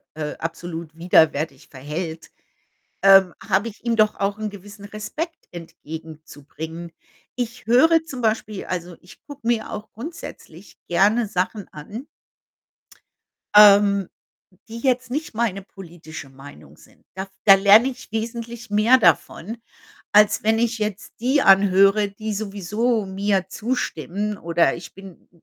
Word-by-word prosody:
äh, 150 -1 -4
absolut 165 -1 -6
widerwärtig 160 -4 +2
verhält, 160 +4 -6 0.7
ähm, 195 -2 +6
habe 200 +4 +1
ich 215 - -17
ihm 235 -1 +1
doch 215 -1 +3
auch 200 +1 -2
'n 215 -1 -3
gewissen 200 +1 -12
Respekt 265 - -6
entgegenzubringen. 160 0 -9 0.4
Ich 245 0 -5
höre 320 +8 +5
zum 265 -5 -8
Beispiel 215 -2 -2
also, 175 -1 -5
ich 180 - -17
gucke 285 -5 -10
mir 235 -2 0
auch 215 +1 -7
grundsätzlich 225 - -10
gerne 210 +6 +2
Sachen 195 +1 -3
an 210 - -9 1.5
ähm, 200 -2 +6 0.6
die 225 +1 -8
jetzt 255 0 0
nicht 295 0 -4
meine 215 -4 -1
politische 170 -6 -11
Meinung 135 - -15
sind. - - -22
Da 190 - -4
f 195 - -21
da 195 - +9
lerne 205 +5 +6
ich 255 -4 -9
wesentlich 230 0 -5
mehr 215 +5 +5
davon, 195 - +1 0.5
als 210 0 +5
wenn 220 +1 +2
ich 235 0 0
jetzt 210 -1 -4
die 265 +4 +2
anhöre, 195 +1 +5
die 215 +2 -6
sowieso 210 +2 -2
mir 190 -1 -1
zustimmen 210 -3 -3
oder 170 0 +1
ich 170 - -11
bin 195 -3 -14
200 Hz, 130 wpm, -22 LUFS, 175-225 Hz, 1.5 s, da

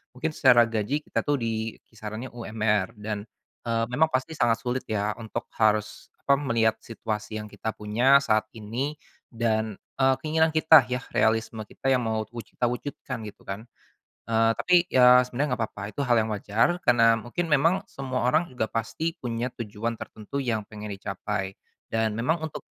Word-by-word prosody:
mungkin 160 +5 -2
secara 125 -5 +6
gaji 115 +7 -1
kita, - - -2
tuh, 145 - +3
di 110 -1 -2 0.2
kisarannya 110 +3 -7
UMR 110 -2 -1
dan, 105 0 -5 0.4
eee, 115 0 +1
memang 155 +5 +3
pasti 130 +2 -1
sangat 120 -7 +1
sulit, 125 +1 -2
ya, 105 -1 0
untuk 110 -2 -5 0.2
harus 105 -1 +1 0.2
apa, 140 0 +4
melihat 110 -4 +1
situasi 110 -1 -5
yang 105 - -5
kita 110 - -4
punya 120 +6 +4
saat 110 -3 +2
ini, 125 +8 -3 0.3
dan, 110 -2 -1 0.2
eee, 135 0 +4
keinginan 160 +1 +3
kita, 155 -5 +7
ya, 125 0 -2
realisme 110 0 +1
kita 135 - -2
yang 125 -1 +3
mau 110 -1 0
wuju 115 0 -10
kita 125 - +1
wujudkan, 125 0 -4
gitu, 105 - -12
kan. 100 +5 -6 0.6
Eee, 115 0 +4
tapi, 180 - +1
ya, 125 -2 +7
sebenarnya 125 0 -1
nggak - - -9
apa-apa, 105 - -10
itu 145 - -7
hal 120 -1 +4
yang 110 0 0
wajar 115 - +1
karena 115 -1 +5
mungkin 120 +10 -3
memang 160 +4 +3
semua 130 -2 -3
orang 160 +7 +3
juga 125 -3 -1
pasti 155 +9 -2
punya 120 0 -3
tujuan 115 +1 -3
tertentu 110 +6 -7
yang 110 -4 -1
pengen 105 0 -7
dicapai, 100 0 -4 0.4
dan 110 -1 0
memang 155 +9 0
untuk 155 - -8
115 Hz, 170 wpm, -26 LUFS, 110-130 Hz, 0.6 s, kita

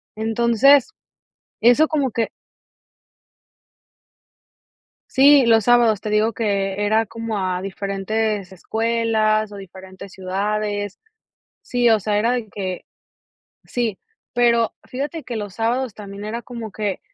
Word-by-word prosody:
Entonces, 235 - +3 0.7
eso 245 +7 +5
como 285 -5 0
que 230 +1 -1 2.9
Sí, 275 0 +7
los 225 -2 +4
sábados 240 -4 +4
te 215 - -5
digo 210 +2 +2
que 200 -2 -1
era 220 +2 +2
como 225 0 -5
a 185 -2 -1
diferentes 200 +1 -2
escuelas 220 +1 0
o 205 - -9
diferentes 190 0 -11
ciudades. 205 +2 -3 0.6
Sí, 245 -1 +1
o 220 - +5
sea, 205 +1 0
era 230 +3 +2
de 240 -4 -3
que 185 -3 -5 0.8
sí, 230 -5 -2 0.4
pero 235 -2 +3
fíjate 290 +5 -5
que 240 - -5
los 205 -3 -5
sábados 235 +1 -1
también 200 -1 -8
era 230 +3 -4
como 235 -2 -7
que, 205 -3 -3
220 Hz, 120 wpm, -21 LUFS, 200-235 Hz, 2.9 s, Sí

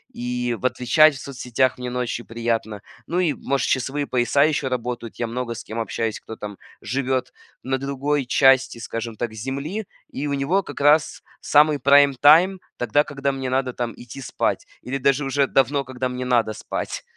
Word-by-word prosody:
и 125 0 -2
в - - -8
отвечать 145 +5 +4
в - - -8
соцсетях 130 -2 -1
мне 125 0 -5
ночью 125 -1 -3
приятно, 115 -2 -2 0.3
ну 175 - -1
и, 170 -5 +2
может, 140 0 -1
часовые 135 +2 -1
пояса 125 +3 +2
еще 150 -2 +1
работают, 125 -2 -4
я 120 - 0
много 120 0 -3
с 120 - -8
кем 110 +1 -6
общаюсь, 115 -1 -2
кто 110 - -9
там 105 -2 -8 0.2
живет 130 +1 -2 0.3
на 130 +1 -1
другой 140 +1 -1
части, 135 0 +4
скажем 115 0 -5
так, 110 0 -4
Земли, 140 - -4 0.3
и 145 +2 -2
у 140 - -1
него 145 +8 +1
как 145 - -8
раз 150 +2 +3 0.2
самый 150 0 +4
прайм-тайм 145 +7 +5 0.2
тогда, 145 +4 +2
когда 140 -2 -2
мне 135 -1 -4
надо 130 -1 0
там 120 -1 -3
идти 125 +3 -10
спать 125 - -2 0.2
или 135 +2 -3
даже 140 +1 +2
уже 135 0 +1
давно, 140 +1 +2
когда 130 0 -4
мне 125 0 -4
надо 120 -3 +2
спать. 110 - -5
130 Hz, 180 wpm, -22 LUFS, 120-140 Hz, 0.3 s, прайм-тайм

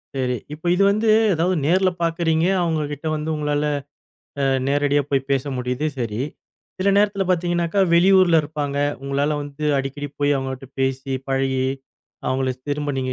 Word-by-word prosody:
சரி. 125 -2 0 0.2
இப்ப 155 +3 -11
இது 195 - +3
வந்து 215 +2 0 0.3
ஏதாவது 175 +3 +1
நேர்ல 185 +4 +3
பாக்கறீங்க. 165 -1 +1 0.2
அவங்க 160 -2 0
கிட்ட 145 +2 -9
வந்து 155 +1 -4
உங்களால 150 0 -1 0.8
அ, - - +3 0.2
நேரடியா 145 +1 +2
போய் 135 -1 0
பேச 135 -2 +1
முடிது 125 +4 -2
சரி. 115 0 -2 0.6
சில 190 +2 +1
நேரத்துல 200 -1 +2
பாத்தீங்கன்னாக்கா, 175 +1 +1
வெளியூர்ல 180 0 +5
இருப்பாங்க. 145 -1 -3 0.3
உங்ளால 140 +2 0
வந்து 145 +1 -7
அடிக்கடி 135 +2 -4
போய் 145 0 +3
அவங்கட்ட 135 0 -5
பேசி, 135 +1 -1 0.2
பழகி, 135 -1 0 0.6
அவங்கள 130 0 0 0.2
திரும்ப 145 0 -1
நீங்க 130 0 -2
145 Hz, 145 wpm, -22 LUFS, 135-170 Hz, 0.8 s, வெளியூர்ல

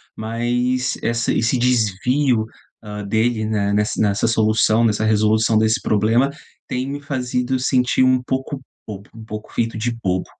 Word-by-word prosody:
mas 120 +3 -1
essa 115 0 0
esse 115 +3 +1
desvio, 125 +1 +1 0.4
ah, 105 -1 -7
dele, 110 +2 0
né, 105 -2 0
nessa 105 +1 0
nessa 105 +1 +1
solução, 110 0 +2
nessa 110 -1 +1
resolução 110 +1 +2
desse 110 +1 +2
problema 110 +6 +2 0.4
tem 130 +2 -3
me 145 +1 -4
feito 130 -2 -2
sentir 125 0 +2
um 130 0 +3
pouco 135 +2 -3 0.3
bobo, 100 -1 -9
um 115 - -10
pouco 105 0 -8
feito 115 -1 -1
de 120 +2 -2
bobo. 90 -1 0
115 Hz, 150 wpm, -20 LUFS, 110-125 Hz, 0.4 s, um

